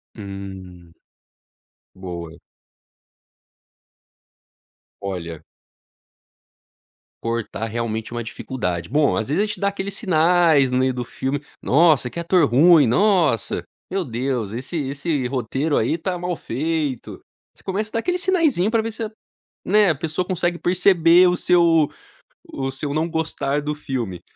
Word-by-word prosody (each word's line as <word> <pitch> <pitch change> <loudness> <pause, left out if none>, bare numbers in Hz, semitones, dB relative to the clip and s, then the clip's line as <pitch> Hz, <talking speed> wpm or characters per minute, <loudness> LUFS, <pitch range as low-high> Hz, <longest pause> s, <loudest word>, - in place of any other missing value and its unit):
Hum. 95 -4 -9 1.0
Boa. 85 -3 -8 2.6
Olha 85 -5 -5 1.8
cortar, 115 -1 -3
realmente, 110 0 -3
é - - -6
uma 120 - -3
dificuldade, 90 -8 -4
bom, 145 +1 +2
às 110 +4 -2
vezes, 180 +8 +2
a - - +1
gente 210 - -6
dá 200 - +1
aqueles 200 0 -3
sinais 165 - +3
no 125 - +1
meio 130 0 +2
do 125 -1 -4
filme: 135 +4 -3 0.2
"Nossa, 150 -3 +4
que 170 - -6
ator 170 -3 +3
ruim, 150 +2 +6
nossa, 170 - +2 0.3
meu 190 -1 0
Deus 120 -4 -2
esse 130 +8 -5
esse 140 -2 -1
roteiro, 135 +4 -1
aí, 155 +9 0
tá 180 +2 -2
mal 180 0 -3
feito", 150 -1 -3 0.3
você - - -16
começa 210 +3 -3
a - - -37
dar 230 - +1
aquele 360 +9 -1
sinaiszinho 320 - +2
para 225 -1 +2
ver 225 - -4
se 225 +1 -5
a 215 - -5 0.5
né, 205 -1 +4
a - - +2
pessoa 165 +4 -2
consegue 175 -2 -1
perceber 180 -1 +5
o 180 - +2
seu 165 -4 +4 0.7
o 135 -1 -3
seu 140 +1 -3
não 160 +2 0
gostar 150 -3 -1
do 150 +1 -3
filme, 120 - -4
150 Hz, 140 wpm, -22 LUFS, 120-180 Hz, 2.6 s, ruim